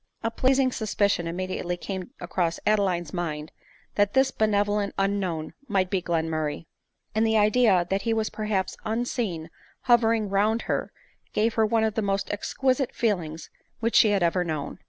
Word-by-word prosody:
A 225 - 0
pleasing 260 +2 +2
suspicion 205 -6 0
immediately 180 0 -3
came 190 0 -5
across 170 -2 -1
Ade 215 0 +4
line's 175 -5 -1
mind 155 -4 -3 0.4
mat 205 0 +2
this 265 0 +4
benevolent 205 -2 +1
unknown 195 -5 -1
might 190 -4 +1
be 190 -2 +1
Glen 165 -2 -1
murray; 155 -1 -2 0.5
and 220 +1 +2
the 220 -1 +3
idea 210 -4 +4
that 195 +1 +1
he 230 - -1
was 220 -1 0
perhaps 210 -3 -2
unseen 220 -7 -2 0.3
hov 240 -2 +5
ering 225 -3 +1
round 215 +3 +2
her, - - -2 0.4
gave 225 +2 +2
her 220 -1 +3
one 225 0 +2
of 220 -1 +1
the 220 - -1
most 200 -1 -1
exquisite 255 +5 -1
feel 215 -5 +2
ings 160 0 -8 0.3
which 230 0 0
she 215 - +7
had 200 -3 +2
ever 175 +1 +2
known. 155 -4 -4
205 Hz, 175 wpm, -26 LUFS, 175-220 Hz, 0.5 s, she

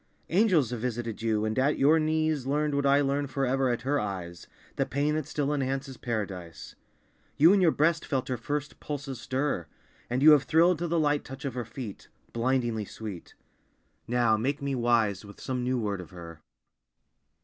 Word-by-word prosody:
Angels 175 - +3
have 120 - -3
visited 115 -2 -3
you, 110 -1 +1
and 110 +3 -1
at 140 +3 +2
your 150 +4 +5
knees 155 -3 0
Learned 150 +1 0
what 140 0 +1
I 140 +1 +5
learn 140 +1 0
forever 135 -1 0
at 120 -1 -2
her 145 +3 +1
eyes, 90 -4 -5 0.3
The - - 0
pain 145 +5 0
that 155 -2 -2
still 145 -1 -1
enhances 135 -1 -2
Paradise. 95 -10 -5 0.6
You 165 +6 +7
in 200 - +4
your 175 - +5
breast 160 +2 +2
felt 135 -4 -2
her 130 - -1
first 145 +5 -4
pulses 140 -4 -5
stir; 130 - -1 0.4
And 125 +3 0
you 155 - +9
have 150 -2 +7
thrilled 170 +2 +4
to 175 - -1
the 170 +1 0
light 150 -1 +1
touch 135 +1 -9
of 135 - -2
her 120 -1 -4
feet, 115 -3 -8 0.3
Blindingly 120 -2 0
sweet. 100 -4 -8 0.7
Now 120 -2 +3
make 135 +6 -1
me 140 0 -2
wise 115 -5 +1
with 100 -1 -13
some 130 -2 -3
new 130 +1 0
word 100 -5 -2
of 85 - -11
Her." 85 -3 -11
130 Hz, 185 wpm, -28 LUFS, 115-145 Hz, 0.7 s, you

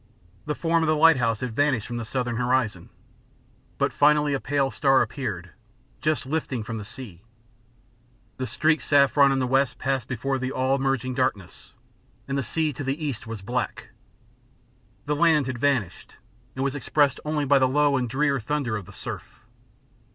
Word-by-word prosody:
The 150 - -1
form 165 +1 +1
of 160 - +1
the 155 - +3
lighthouse 130 -8 +4
had 125 -3 -4
vanished 145 -6 +1
from 120 - -5
the 115 - -4
southern 120 0 -2
horizon, 120 -7 0 0.9
but - - 0
finally 150 0 +3
a 135 - 0
pale 140 -1 0
star 135 -2 +3
appeared, 95 - -5 0.5
just 155 -1 0
lifting 135 -5 -2
from 110 +1 -5
the - - -6
sea. 105 -6 -10 1.2
The 130 - -3
streaked 155 +7 +1
saffron 140 -1 +4
in 135 - +1
the 130 - +1
west 135 0 +1
passed 135 -2 -1
before 135 +1 -2
the 130 +1 -3
all 130 +1 +1
merging 135 -1 -1
darkness, 105 -8 -3 0.5
and 135 - -2
the 140 - +1
sea 155 +3 -1
to 140 - -6
the 140 +4 -2
east 125 -7 -4
was 115 -3 -7
black. 120 +3 -3 1.2
The 150 0 0
land 155 -2 +3
had 130 -1 -4
vanished, 130 -10 -1 0.4
and 130 - -2
was 135 -1 0
expressed 140 -1 +1
only 150 -1 -1
by 140 0 +4
the 130 -1 +3
low 145 +1 +3
and 125 -3 -1
drear 140 +2 +1
thunder 125 0 -2
of 100 -3 -9
the 100 - -12
surf. - - -8
135 Hz, 175 wpm, -25 LUFS, 120-145 Hz, 1.2 s, lighthouse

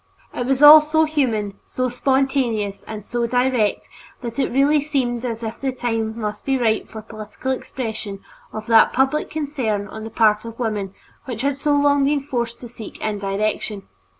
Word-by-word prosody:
It 245 - -3
was 270 +1 +2
all 305 +1 +11
so 315 +1 +2
human, 230 -10 -1
so 255 0 -2
spontaneous, 250 -5 0
and 215 -2 -6
so 235 +2 -2
direct 245 -3 +1 0.3
that 235 +1 -5
it 270 - +1
really 280 +4 +3
seemed 255 -5 -1
as 230 -2 -4
if 220 0 -5
the 270 -1 0
time 225 -3 -2
must 210 -1 -4
be 270 -1 +1
ripe 225 -3 +1
for 220 -1 -9
political 215 +4 -6
expression 220 -6 -5 0.3
of 215 0 -6
that 225 -1 +5
public 270 +4 +1
concern 265 -10 -2
on 220 +2 -8
the 225 - -6
part 215 -1 +3
of 230 0 -9
women 210 -5 -3 0.3
which 245 -2 -5
had 280 0 +1
so 290 +1 +1
long 285 -1 +3
been 285 0 +1
forced 235 -4 -3
to 245 - -7
seek 225 -2 -10
indirection. 205 0 -2
235 Hz, 180 wpm, -21 LUFS, 215-270 Hz, 0.3 s, all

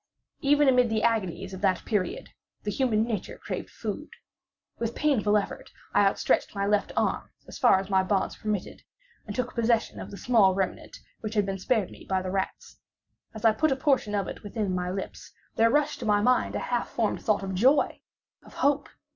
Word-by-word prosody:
Even 290 0 +4
amid 250 -2 +4
the 220 -1 0
agonies 195 -4 0
of 190 - -7
that 190 -3 +1
period, 205 -6 -2 0.3
the 210 - -2
human 220 -3 +1
nature 225 -2 -4
craved - - -5
food. - - -5 0.7
With 230 0 -2
painful 220 -8 +2
effort 205 - -4 0.2
I 205 0 +5
outstretched 195 - +1
my 200 0 0
left 205 0 +1
arm - - 0 0.2
as - - -9
far - - +6
as 190 - -5
my 190 -1 +3
bonds 190 0 0
permitted, 210 -3 -4 0.5
and 205 - -5
took 250 -1 -2
possession 235 -1 +1
of - - -7
the 200 - -9
small 210 -6 +4
remnant 190 -1 -3 0.2
which 220 0 -5
had 205 -2 +3
been 195 0 -3
spared 210 0 0
me - - -13
by 190 -1 +1
the 185 - -3
rats. 190 0 -4 0.6
As 220 - -5
I 225 - +7
put 310 +8 +1
a - - +3
portion 265 -6 +1
of 200 - -1
it - - -7
within 205 -2 -3
my 180 0 -1
lips, 195 +1 -6 0.2
there 230 +1 +4
rushed 295 +3 +1
to 240 - -5
my 205 -1 +4
mind 250 +4 +2
a - - 0
half 240 - 0
formed 225 -3 -1
thought 210 -2 +1
of 190 0 -3
joy—of 260 +9 0
hope. 285 0 +1
210 Hz, 195 wpm, -27 LUFS, 195-240 Hz, 0.7 s, I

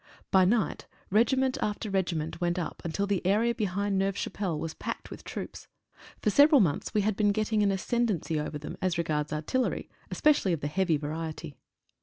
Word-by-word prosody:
By 190 -2 +6
right 215 +3 +1 0.3
regiment 255 +5 +3
after 210 0 -2
regiment 170 -4 -1
went 175 0 +1
up 175 -3 -4
until 170 +4 -1
the 200 -2 -1
area 215 +6 +2
behind 200 -2 -1
Neuve 195 0 0
Chapelle 185 -6 -2
was 160 +1 -4
packed - - -6
with - - -9
troops. - - -7 0.6
For 210 - +3
several 290 +4 +7
months 170 -10 +1
we 210 - +4
had 210 0 0
been 205 0 +3
getting 215 +1 +1
an 205 - +3
ascendency 195 -6 0
over 150 0 -3
them 150 - -7
as 185 -2 0
regards 150 -3 -1
artillery, 155 +12 -1 0.2
especially 290 - +3
of 165 - -2
the 145 - -1
heavy 170 0 +1
variety. 155 +1 -5
190 Hz, 180 wpm, -29 LUFS, 165-215 Hz, 0.6 s, several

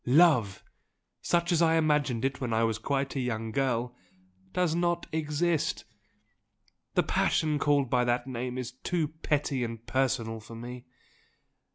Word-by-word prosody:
Love 130 - +4 0.6
such 175 +1 +1
as 170 -1 +3
I 165 -1 +4
imagined 150 -6 +2
it 135 0 -2
when 120 -3 -1
I 110 +1 +2
was 115 -1 0
quite 135 +3 -1
a - - 0
young 115 -3 -2
girl 125 -1 0 0.6
does 180 -3 +1
not 175 0 0
exist. 160 +1 0 1.1
The - - +4
passion 155 -2 +1
called 145 -2 +2
by 125 -1 +3
that 120 0 +1
name 125 -1 -4
is 125 -2 -4
too 155 +5 -2
petty 150 -4 -1
and 115 -1 -5
personal 115 -4 0
for 115 +1 -11
me. 120 +2 -8
135 Hz, 150 wpm, -29 LUFS, 120-155 Hz, 1.1 s, Love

